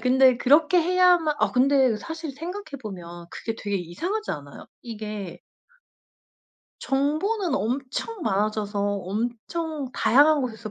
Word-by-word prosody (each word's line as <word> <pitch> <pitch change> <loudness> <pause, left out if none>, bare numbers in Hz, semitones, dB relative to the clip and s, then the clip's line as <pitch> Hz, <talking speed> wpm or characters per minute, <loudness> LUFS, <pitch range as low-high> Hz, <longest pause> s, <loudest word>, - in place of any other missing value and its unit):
근데 260 0 +5
그렇게 305 +7 +4
해야만 355 -2 +4
아 - - +1
근데 260 -2 +3
사실 320 +3 -6
생각해 335 0 -7
보면 175 -4 -8
그게 225 - -5
되게 205 -2 -2
이상하지 340 - -3
않아요? 145 -2 -7 0.2
이게 210 -5 -6 1.4
정보는 310 +8 0
엄청 275 - -3
많아져서 205 -1 -1
엄청 235 - -3
다양한 285 +7 +4
곳에서 230 -4 -5
255 Hz, 270 characters per minute, -25 LUFS, 210-320 Hz, 1.4 s, 근데